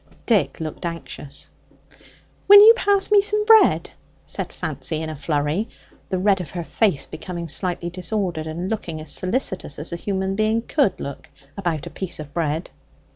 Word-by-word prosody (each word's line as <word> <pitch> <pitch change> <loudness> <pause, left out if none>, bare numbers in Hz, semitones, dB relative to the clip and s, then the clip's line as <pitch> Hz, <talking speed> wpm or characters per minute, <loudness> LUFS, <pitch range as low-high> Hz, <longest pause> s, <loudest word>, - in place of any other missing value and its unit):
Dick 220 -5 +1
looked 155 -2 -6
anxious. 165 -4 -5 1.0
"Will 405 +1 +10
you 435 +2 +10
pass 405 -3 +2
me 410 -1 +7
some 420 +1 +1
bread?" 445 0 +5 0.3
said - - -4
Fancy 155 -2 -3
in 160 0 -4
a - - -6
flurry, 150 +7 -1 0.4
the 190 - -1
red 195 0 +2
of 165 - -7
her 175 -1 -5
face 190 -4 0
becoming 175 -2 -7
slightly 175 +2 -2
disordered, 180 -3 -2
and 170 +4 -4
looking 185 -7 -4
as 155 -2 -5
solicitous 185 - -1
as 150 +3 -3
a - - -3
human 190 +1 -2
being 215 +2 +1
could 275 - +1
look 140 -1 -7 0.3
about 170 -6 -2
a - - -8
piece 185 -4 -4
of 150 -1 -9
bread. 160 0 -2
180 Hz, 170 wpm, -22 LUFS, 155-215 Hz, 1.0 s, Will